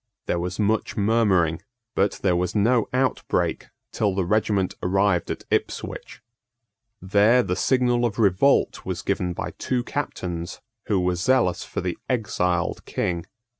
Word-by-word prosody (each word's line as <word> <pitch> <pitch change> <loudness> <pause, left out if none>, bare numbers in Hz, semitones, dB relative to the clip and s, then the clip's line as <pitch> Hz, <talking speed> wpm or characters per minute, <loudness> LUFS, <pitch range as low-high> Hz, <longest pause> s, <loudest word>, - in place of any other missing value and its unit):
There 85 - -1
was 90 +2 -3
much 110 +1 0
murmuring; 100 -6 +2 0.3
but 100 +1 +2
there 90 -3 +3
was 90 +2 -1
no 115 +3 +2
outbreak 130 +1 0 0.2
till 100 -3 0
the 95 -2 0
regiment 100 -1 +1
arrived 95 -1 +1
at - - -4
Ipswich. - - -3 0.8
There 105 +6 +4
the 90 - -1
signal 125 +1 +2
of 115 -4 0
revolt 110 +5 +3
was - - -4
given 90 -1 -1
by - - -4
two 125 -2 -1
captains 90 -11 -4 0.3
who 100 -3 +2
were 90 0 +1
zealous 90 -1 +1
for - - -4
the 90 -1 -3
exiled 90 -8 0
King. 85 0 -2
100 Hz, 140 wpm, -24 LUFS, 90-115 Hz, 0.8 s, There